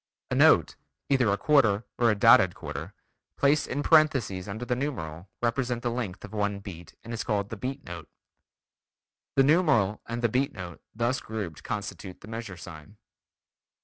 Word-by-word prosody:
A -, -, +1 dB
note, -, -, +5 dB, 0.3 s
either 130 Hz, -5 st, +3 dB
a 100 Hz, -, +1 dB
quarter 115 Hz, -5 st, +3 dB, 0.2 s
or 120 Hz, -1 st, +4 dB
a 105 Hz, -, +3 dB
dotted 100 Hz, -, +6 dB
quarter, -, -, -7 dB, 0.4 s
placed 145 Hz, +2 st, +3 dB
in 145 Hz, +2 st, -2 dB
parenthesis 130 Hz, -, +3 dB
under 110 Hz, +4 st, -5 dB
the 125 Hz, -, 0 dB
numeral, 95 Hz, -, -5 dB
represents 120 Hz, 0 st, 0 dB
the 120 Hz, -, 0 dB
length 110 Hz, -6 st, -4 dB
of 105 Hz, -, -13 dB
one 105 Hz, -1 st, -1 dB
beat 95 Hz, -4 st, -10 dB
and 115 Hz, +1 st, -7 dB
is 115 Hz, -, -3 dB
called 105 Hz, -3 st, -1 dB
the -, -, -3 dB
beat 135 Hz, +6 st, -5 dB
note. 85 Hz, -3 st, -9 dB, 1.3 s
The 135 Hz, -, +5 dB
numeral 135 Hz, -, +3 dB
and 120 Hz, +1 st, -4 dB
the -, -, +5 dB
beat 130 Hz, +5 st, 0 dB
note 90 Hz, -4 st, -8 dB
thus 120 Hz, +3 st, 0 dB
grouped 100 Hz, -9 st, -6 dB
constitute 100 Hz, -2 st, -6 dB
the -, -, -12 dB
measure 115 Hz, -4 st, -6 dB
sign. 85 Hz, +3 st, -11 dB
110 Hz, 170 wpm, -27 LUFS, 100-125 Hz, 1.3 s, dotted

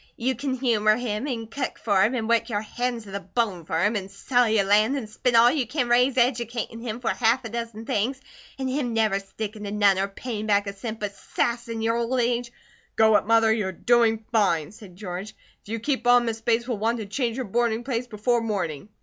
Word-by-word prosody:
You 255 Hz, +3 st, 0 dB
kin 260 Hz, +2 st, -3 dB
humour 220 Hz, -5 st, +2 dB
him, 235 Hz, +1 st, -3 dB
and 225 Hz, -4 st, -4 dB
cook 270 Hz, 0 st, -3 dB
for 200 Hz, -4 st, +2 dB
him, 235 Hz, +6 st, +3 dB
an 225 Hz, -3 st, -2 dB
work 235 Hz, +2 st, +2 dB
your 205 Hz, -2 st, -1 dB
hands 240 Hz, +1 st, -3 dB
to 200 Hz, -, -12 dB
the 200 Hz, -, -3 dB
bone 195 Hz, -3 st, -2 dB
fur 160 Hz, +2 st, -1 dB
him, 215 Hz, +2 st, +1 dB
and 195 Hz, -2 st, -3 dB
sell 245 Hz, +4 st, +1 dB
your 215 Hz, -2 st, +3 dB
land, 215 Hz, +7 st, +3 dB
and 240 Hz, -6 st, -5 dB
spend 240 Hz, +3 st, -1 dB
all 235 Hz, +1 st, +7 dB
you 270 Hz, -5 st, -1 dB
can 250 Hz, -1 st, -1 dB
raise 250 Hz, +2 st, +4 dB
educatin' 235 Hz, -2 st, 0 dB
him 230 Hz, -1 st, -4 dB
for 235 Hz, -, 0 dB
half 240 Hz, +2 st, +1 dB
a -, -, -4 dB
dozen 230 Hz, -1 st, -5 dB
things, 245 Hz, +7 st, -1 dB, 0.4 s
an' 265 Hz, -1 st, -2 dB
him 255 Hz, -3 st, -2 dB
never 215 Hz, -3 st, +2 dB
stickin 210 Hz, +2 st, -7 dB
to 205 Hz, -, -4 dB
none 200 Hz, -2 st, +3 dB
or 195 Hz, -, +1 dB
payin' 215 Hz, +1 st, -5 dB
back 205 Hz, -1 st, +3 dB
a 200 Hz, -, -4 dB
cent, 220 Hz, +2 st, -6 dB
but 205 Hz, -1 st, -3 dB
sass 235 Hz, +3 st, -2 dB
in 225 Hz, -1 st, -4 dB
your 230 Hz, +1 st, +1 dB
old 235 Hz, +2 st, 0 dB
age 240 Hz, 0 st, 0 dB, 0.2 s
" -, -, -35 dB
"Go 220 Hz, -1 st, +5 dB
it, -, -, +2 dB
Mother, 225 Hz, -1 st, +4 dB
you're 210 Hz, -4 st, -1 dB
doing 225 Hz, +2 st, +2 dB
fine!" 185 Hz, -8 st, +2 dB
said 200 Hz, -4 st, -14 dB
George. 190 Hz, +1 st, -6 dB, 0.3 s
"If -, -, -23 dB
you 225 Hz, -, -2 dB
keep 260 Hz, +1 st, -1 dB
on 245 Hz, 0 st, +6 dB
Miss 225 Hz, -1 st, -3 dB
Bates 235 Hz, +1 st, +1 dB
will 240 Hz, -5 st, -2 dB
want 230 Hz, +3 st, +1 dB
to 220 Hz, -, -5 dB
change 235 Hz, +3 st, -2 dB
her 260 Hz, -, -1 dB
boarding 235 Hz, +1 st, 0 dB
place 245 Hz, -1 st, -2 dB
before 235 Hz, +2 st, 0 dB
morning." 195 Hz, -6 st, -3 dB
225 Hz, 235 wpm, -25 LUFS, 210-240 Hz, 0.4 s, all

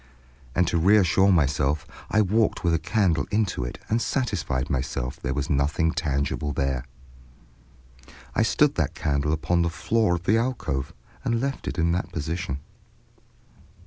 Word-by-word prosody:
And 90 Hz, -1 st, +3 dB
to 85 Hz, -, +1 dB
reassure 95 Hz, +1 st, +5 dB
myself, 75 Hz, -2 st, +1 dB, 0.2 s
I 110 Hz, -, +3 dB
walked 110 Hz, +2 st, +1 dB
with 85 Hz, -2 st, +2 dB
a 80 Hz, -, +2 dB
candle 95 Hz, -4 st, +1 dB
into 100 Hz, -, 0 dB
it -, -, -5 dB
and 115 Hz, +2 st, +1 dB
satisfied 85 Hz, -, -1 dB
myself 65 Hz, -2 st, -2 dB
that -, -, -26 dB
there 65 Hz, -, -2 dB
was 70 Hz, 0 st, -1 dB
nothing 75 Hz, +3 st, +1 dB
tangible 75 Hz, -2 st, -1 dB
there. 65 Hz, -2 st, -1 dB, 1.5 s
I -, -, +2 dB
stood -, -, +3 dB
that -, -, -1 dB
candle 70 Hz, 0 st, 0 dB
upon 85 Hz, +2 st, +1 dB
the 85 Hz, -, +1 dB
floor 110 Hz, +3 st, +1 dB
of 85 Hz, -, -5 dB
the 110 Hz, +5 st, +3 dB
alcove 115 Hz, -, -2 dB, 0.3 s
and 115 Hz, -3 st, 0 dB
left 135 Hz, +2 st, -3 dB
it -, -, -3 dB
in 85 Hz, 0 st, +2 dB
that 90 Hz, +2 st, -2 dB
position. 80 Hz, -2 st, -3 dB
85 Hz, 155 wpm, -25 LUFS, 70-100 Hz, 1.5 s, reassure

